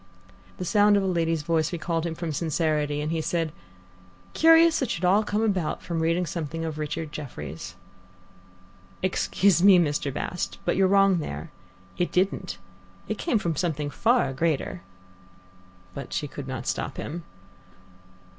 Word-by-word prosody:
The 180 - -4
sound 205 +2 +4
of 200 - +1
a - - -1
lady's 165 -4 0
voice 160 0 +1
recalled 170 -1 -2
him 165 - -4
from 170 -1 -4
sincerity, 150 -1 0
and 150 +1 -2
he 165 -1 0
said: 165 -1 -1 0.8
"Curious 325 0 +6
it 260 - -1
should 175 - -1
all 195 +4 +5
come 210 +1 -1
about 190 -8 -1
from 170 -1 -3
reading 165 +2 +1
something 165 0 -4
of 155 -1 -4
Richard 150 +1 -4
Jefferies." 90 - -7 1.3
"Excuse 185 0 +2
me, 195 -1 +8
Mr. 150 -4 +1
Bast, 175 +5 -4
but 175 - +1
you're 190 0 +4
wrong 195 -2 +4
there. 75 - -6 0.5
It 175 - 0
didn't. 185 0 0 0.5
It 215 - -3
came 320 -9 +1
from 170 -6 -1
something 150 -5 -1
far 235 - +2
greater." 160 +4 -1 1.1
But 140 - -7
she 145 - -1
could 140 -1 -8
not 130 -3 -5
stop - - -3
him. 170 +3 -5
165 Hz, 155 wpm, -26 LUFS, 150-190 Hz, 1.3 s, me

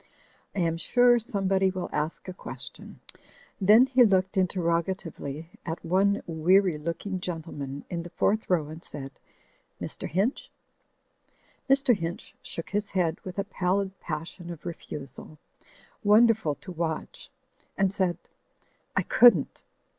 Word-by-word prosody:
I 195 - 0
am 165 -1 +1
sure 245 +6 +4
some 210 -4 -2
body 190 0 +3
will 185 -1 -4
ask 150 +5 -3
a 185 - -5
question." - - -9 0.6
Then 215 +6 +7
he 260 -1 +5
looked 190 -3 +3
interroga 180 -2 +1
tively 160 -3 -7
at 165 0 -5
one 195 +4 +2
weary 175 +1 +3
looking 170 +5 -3
gentleman 155 -6 -5
in 170 -2 -3
the 175 - -8
fourth 215 +5 0
row 165 -5 +2
and 160 +2 -9
said, 135 -2 -6 0.7
"Mr. - - -5
Hinch?" 195 - 0 1.2
Mr. 270 -3 +5
Hinch 170 -2 -5
shook 165 - -7
his 205 0 -1
head 175 -3 0
with 185 0 -8
a 200 - +1
pallid 190 0 -1
passion 165 +2 -6
of 170 -1 -8
refusal, 150 -3 -8 0.7
wonderful 215 -6 +4
to 145 +6 -10
watch, 165 -2 -4 0.5
and 195 -1 +2
said, 185 -4 0 0.8
"I - - +2
couldn't! 225 - +5
180 Hz, 135 wpm, -27 LUFS, 165-200 Hz, 1.2 s, Then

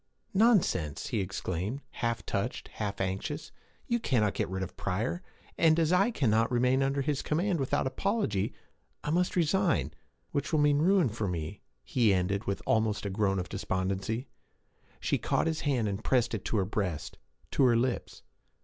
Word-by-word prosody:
'Nonsense!' 175 - +2
he 115 - 0
exclaimed, 95 +4 -3
half 115 -1 -2
touched, - - -2
half 100 -1 -4
anxious. 145 - -3 0.3
'You 235 0 +1
cannot 110 - +1
get - - -1
rid 95 0 -2
of - - -7
Pryor; 110 - -2 0.4
and 160 0 +5
as 165 +1 +3
I 195 +5 +4
cannot 115 - +2
remain 125 +2 +3
under 135 +1 +1
his 145 -1 0
command 175 +3 0
without 135 -1 0
apology, 130 - 0 0.5
I 150 - -1
must 180 +2 +1
resign 180 +1 +2 0.4
which 145 0 -2
will 155 - +3
mean 145 -1 +4
ruin 180 -2 +4
for 110 -1 -3
me,' 85 +2 -4 0.2
he 110 - +3
ended, 100 +3 0
with 100 - -2
almost 110 -1 +1
a 100 - -2
groan 95 -1 +1
of 90 - -2
despondency. 95 +7 -2 0.7
She - - 0
caught - - +1
his 160 -1 -1
hand, 130 -7 +1
and 100 +2 -3
pressed 120 -3 +2
it 110 - -3
to 115 - 0
her 95 - +2
breast, 90 -8 -3 0.3
to 135 - +4
her 120 -2 +5
lips. 125 +1 -2
115 Hz, 170 wpm, -30 LUFS, 100-150 Hz, 0.7 s, and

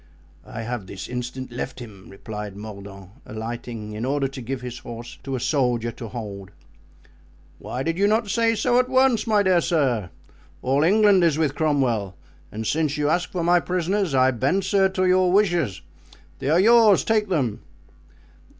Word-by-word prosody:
"I 115 - -6
have 115 -4 -5
this 95 - -7
instant 125 +1 -5
left 125 +2 -5
him," 105 -6 -11
replied 105 0 -8
Mordaunt, 100 -2 -10
alighting, 115 -1 -6
in 110 +2 -5
order 140 +1 0
to 135 0 -8
give 125 +2 -5
his 125 -1 -7
horse 120 0 -9
to 135 -1 -4
a - - -2
soldier 120 -4 0
to 115 0 -8
hold. 100 -4 -7 1.1
"Why 130 - -5
did 165 +3 -2
you 200 - +4
not 220 +1 +1
say 230 +3 +1
so 245 +2 +2
at 255 0 +1
once, 260 -3 +3
my 210 -2 +3
dear 185 -3 +3
sir! 130 - 0 0.5
all 135 +2 +2
England 200 +1 +4
is 160 -3 +3
with 155 -3 +1
Cromwell; 130 - 0 0.3
and 110 +1 -5
since 150 +2 0
you 150 0 +1
ask 175 +3 0
for 175 -2 -2
my 175 +1 +4
prisoners, 180 -1 -1
I 130 0 +4
bend, 135 - 0
sir, 195 -1 +2
to 185 0 0
your 185 0 +3
wishes. 175 - +1 0.6
They 135 - -2
are 160 +3 +4
yours; 220 -1 +6
take 215 -2 +1
them." 125 - -1
135 Hz, 175 wpm, -23 LUFS, 115-185 Hz, 1.1 s, yours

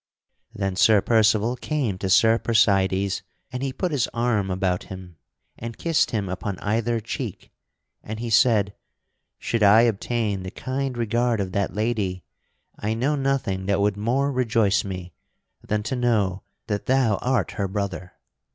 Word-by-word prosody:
Then 95 -2 -3
Sir 105 +2 +5
Percival 110 +2 +2
came 125 -8 -2
to 95 - -2
Sir 110 +5 +5
Percydes 100 -3 +2 0.3
and 125 0 -4
he 135 -1 -1
put 180 +6 -2
his 140 -5 +1
arm 115 -5 +1
about 90 -1 -1
him 90 -3 -10 0.4
and 115 -1 -6
kissed 165 -2 +1
him 105 -4 -2
upon 95 +1 -4
either 115 +4 0
cheek, 110 - -6 0.5
and 110 +1 -7
he 115 -1 -4
said: 105 -3 +4 0.6
"Should 115 - -2
I 105 +2 +7
obtain 110 -2 0
the 95 - -6
kind 130 +3 -4
regard 120 0 0
of 95 -2 -2
that 100 +1 -1
lady, 105 -5 -1 0.6
I 110 +2 -1
know 135 +6 +1
nothing 135 -9 -1
that 100 -1 +1
would 100 0 +2
more 125 +7 0
rejoice 115 -6 +2
me 90 -3 -7 0.5
than 105 0 -1
to 115 +4 -2
know 105 -7 +1 0.2
that 105 -2 -3
thou 130 -6 +3
art 125 -8 0
her 100 - -2
brother. 95 -2 -4
110 Hz, 155 wpm, -24 LUFS, 100-120 Hz, 0.6 s, I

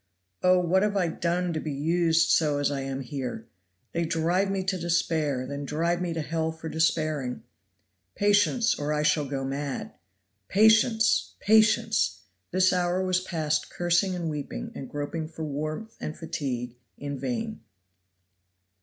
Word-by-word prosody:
"Oh, 185 0 +5
what 180 +1 +2
have 205 0 +1
I 180 -3 +2
done 175 +1 -1
to 155 - -1
be 155 - -4
used 165 +3 +2
so 150 -3 +3
as 145 0 +1
I 140 - -2
am 135 0 -4
here? 125 -3 -5 0.5
They 170 - -1
drive 170 +4 +1
me 195 -1 -1
to 185 -1 -1
despair, 160 -5 0
then 140 +2 -5
drive 170 +5 0
me 175 -1 -1
to 160 - -1
hell 160 +2 -1
for 160 0 -7
despairing. 155 -5 0 0.7
Patience, 205 +4 +3
or 145 +1 -3
I 150 0 0
shall 150 -1 +2
go 135 -1 -3
mad. 140 +1 -4 0.5
Patience! 220 - +4
Patience!" 220 +1 +3 0.3
This 185 +1 +3
hour 180 +1 +1
was 185 0 +1
passed 155 -4 -1
cursing 175 +2 +1
and 170 -2 -3
weeping 150 -3 -5
and 130 - -7
groping 145 +2 -4
for 160 0 -7
warmth 155 +9 -4
and 155 - -5
fatigue 125 -7 -4 0.2
in 140 -1 -5
vain. 225 -3 -3
165 Hz, 155 wpm, -27 LUFS, 145-185 Hz, 0.7 s, Oh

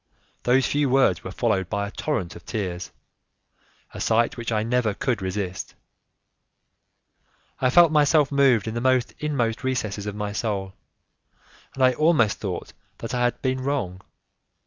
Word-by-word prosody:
Those 130 +2 +3
few 145 -1 +1
words 125 -10 +3
were - - -6
followed 95 -2 0
by 100 0 -1
a - - -8
torrent 100 - -3
of - - -12
tears, 95 -5 -4 1.0
a - - -7
sight 115 +1 +2
which 120 -1 -4
I 110 -1 +1
never 115 -3 0
could 120 -6 -1
resist. 95 -1 -4 1.8
I 130 - +2
felt 170 +4 +6
myself 150 -1 +4
moved 135 -6 +3
in 110 - -3
the 125 +1 +1
inmost 125 -6 -1
recesses 110 -6 -2
of 105 - -4
my 105 -1 -3
soul, 100 -3 -3 1.0
and 135 - 0
I 130 0 +5
almost 155 -6 +2
thought 95 -5 -5 0.2
that 115 +3 -6
I 125 - 0
had 120 - -2
been 130 0 0
wrong. 130 -10 -2
120 Hz, 150 wpm, -24 LUFS, 100-130 Hz, 1.8 s, felt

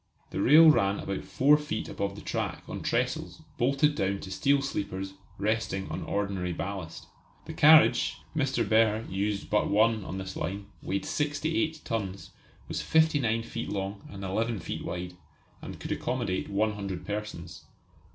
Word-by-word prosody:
The - - -2
rail 155 +7 +8
ran 100 -7 +2
about 100 -1 -4
four 135 +11 +4
feet 150 -7 -4
above 100 0 -3
the 105 - -10
track - - -3
on - - -5
trestles - - -2 0.2
bolted 140 +4 +3
down 100 -7 -1
to 95 - -8
steel 140 +8 +2
sleepers 95 -7 -3 0.2
resting 105 -2 -1
on - - -3
ordinary 95 -3 -2
ballast. 95 -2 -5 0.4
The - - -7
carriage 155 +2 +6 0.2
Mr. 135 -3 +1
Behr 110 0 +3
used 100 +1 -2
but 105 - +2
one 110 +1 +3
on 95 - -5
this 95 0 -6
line 100 +4 -4 0.2
weighed 100 +1 -2
68 155 +2 -1
tons, 100 -4 -4 0.4
was - - -3
59 145 -8 +2
feet 115 0 -5
long 100 0 -3
and 100 -1 -8
11 110 +2 -1
feet - - -5
wide, 90 0 -5 0.5
and - - -8
could - - -6
accommodate 120 -7 -2
one 105 +2 +1
hundred 100 -4 -5
persons. 105 -5 -6
105 Hz, 155 wpm, -28 LUFS, 95-130 Hz, 0.5 s, rail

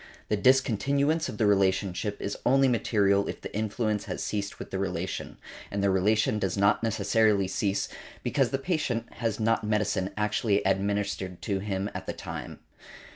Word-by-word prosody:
The 105 - +2
discontinuance 135 +6 +2
of - - -6
the 110 - +2
relationship 100 0 +1
is 100 - -3
only 135 +2 +4
material 100 -5 +2
if - - -5
the - - -8
influence 110 0 -1
has - - -4
ceased 100 -1 -3
with - - -9
the 95 - -2
relation; 95 -1 -3 0.3
and 100 0 -2
the 100 - +3
relation 105 +3 +2
does 95 -1 -1
not 100 +2 +3
necessarily 105 -2 +2
cease 100 +1 -1 0.4
because - - +1
the 135 - 0
patient 135 -7 -2
has 115 -2 -1
not 115 0 +2
medicine 105 -3 0
actually 105 -1 +1
administered 95 -1 -1
to 100 -3 -1
him 95 0 -2
at - - -6
the - - -2
time. - - -7
105 Hz, 165 wpm, -28 LUFS, 100-115 Hz, 0.4 s, only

